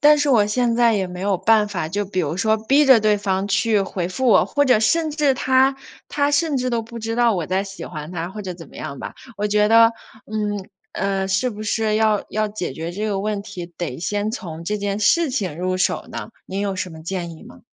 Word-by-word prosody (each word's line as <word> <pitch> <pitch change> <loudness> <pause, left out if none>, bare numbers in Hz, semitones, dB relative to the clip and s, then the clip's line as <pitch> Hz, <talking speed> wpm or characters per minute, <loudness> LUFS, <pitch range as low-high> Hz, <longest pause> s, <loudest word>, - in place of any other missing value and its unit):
但 300 0 +7
是 290 0 +1
我 220 -5 +4
现 235 +2 +1
在 235 -1 +4
也 195 -2 0
没 180 0 -8
有 195 0 +1
办 210 +3 +3
法， 175 -6 -3
就 205 +5 -2
比 185 -1 -1
如 160 -1 -2
说 220 +3 +2
逼 270 +7 +3
着 260 -3 +8
对 210 -1 +3
方 195 -1 -1
去 210 +2 +2
回 180 -2 -3
复 255 +8 -2
我， 220 - +6
或 285 - +1
者 250 -5 +4
甚 315 +8 +2
至 295 -3 +2
他 260 +1 +3 0.3
他 285 0 +1
甚 295 0 +1
至 255 -1 -1
都 235 -1 0
不 230 +1 -9
知 225 0 -3
道 240 -2 +3
我 175 -4 -2
在 190 +3 0
喜 195 -1 -8
欢 155 -2 -7
他 170 0 -4
或 210 +2 -7
者 185 -2 -5
怎 170 -1 -11
么 - - -15
样 140 -3 -6
吧。 - - -7 0.2
我 210 - -1
觉 210 0 +3
得， 230 +1 +6 0.4
嗯， 205 -2 -3 0.2
呃， 195 0 -1
是 195 +7 +1
不 215 -1 -7
是 215 0 0
要 215 -2 +2
要 215 0 0
解 205 -8 -4
决 160 +4 -5
这 210 +4 -3
个 200 -2 -1
问 205 0 -2
题， 190 -4 -7
得 165 -8 -4
先 205 +5 -1
从 170 -7 -7
这 210 +4 -1
件 200 0 -2
事 320 +9 +3
情 190 - -3
入 185 +1 -1
手 185 - 0
呢？ - - -6 0.2
您 195 +1 -4
有 200 -1 -1
什 185 - -3
么 160 -1 -11
建 170 -1 -4
议 - - -15
吗？ - - -14
205 Hz, 265 characters per minute, -21 LUFS, 185-230 Hz, 0.4 s, 着